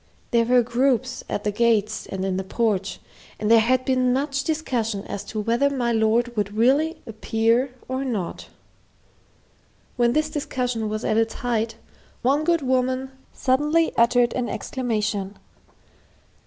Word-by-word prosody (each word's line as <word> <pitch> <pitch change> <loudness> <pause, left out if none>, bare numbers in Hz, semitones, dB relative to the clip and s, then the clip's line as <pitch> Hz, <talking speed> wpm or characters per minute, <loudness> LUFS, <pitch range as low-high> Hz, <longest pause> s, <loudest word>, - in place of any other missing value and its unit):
There 235 -1 +3
were 245 +1 +4
groups 255 +1 0
at 205 - -3
the 210 - 0
gates 215 -1 +1
and 190 0 -4
in 190 -1 -1
the 190 - -2
porch, 200 -2 -1 0.4
and 215 +1 0
there 230 - +8
had 255 +3 +2
been 255 -1 +2
much 275 +2 0
discussion 240 -10 -2
as 200 - -5
to 215 - -5
whether 235 +6 +2
my 250 -4 -1
lord 230 +2 +1
would 205 0 -2
really 280 +8 +2
appear 230 +3 0
or 260 +1 -2
not. 215 -10 -4 1.5
When 240 -1 +3
this 305 +1 0
discussion 250 -6 -2
was 215 +1 -3
at 215 - +1
its 225 0 +1
height, 225 -2 -1 0.5
one 280 +5 +2
good 335 -2 +1
woman 260 0 0 0.2
suddenly 300 +5 +1
uttered 240 +1 +3
an 250 -2 -2
exclamation. 210 -5 -2
240 Hz, 145 wpm, -23 LUFS, 220-260 Hz, 1.5 s, there